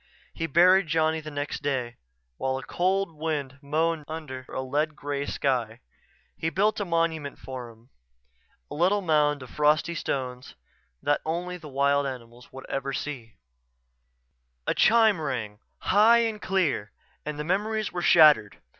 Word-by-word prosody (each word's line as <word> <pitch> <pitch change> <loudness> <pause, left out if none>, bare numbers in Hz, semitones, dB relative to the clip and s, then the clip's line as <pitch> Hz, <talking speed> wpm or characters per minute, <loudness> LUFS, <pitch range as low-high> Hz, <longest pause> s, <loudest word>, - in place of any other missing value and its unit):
He 165 - -3
buried 180 +4 +5
Johnny 160 0 +1
the 155 - -8
next 145 0 -4
day, 130 -4 -2 0.4
while 130 0 -1
a 135 - -7
cold 185 0 0
wind 150 -4 -3
moaned 155 +2 0
under 145 -5 -7
a - - -4
lead 150 +4 -1
gray 145 -1 -4
sky. 120 -5 -1 0.6
He 160 - -2
built 205 +6 +1
a 205 - -1
monument 165 -4 -1
for 130 -2 -8
him; 115 +3 -19 0.8
a - - -4
little 185 +6 +2
mound 150 -5 +2
of 130 - -12
frosty 150 +3 +2
stones 130 -5 -4 0.5
that 145 - +1
only 175 +3 -3
the 160 -3 -11
wild 140 +1 +2
animals 120 -2 -9
would 135 0 -10
ever 135 0 -3
see 130 -6 -6 1.3
A - - +1
chime 220 -5 +4
rang, 110 -8 -4 0.2
high 220 +4 +5
and 215 -2 -3
clear, 160 - 0 0.3
and 150 0 -5
the 150 - -3
memories 210 +5 -1
were 175 - -3
shattered. 150 -12 +6
150 Hz, 150 wpm, -26 LUFS, 135-170 Hz, 1.3 s, shattered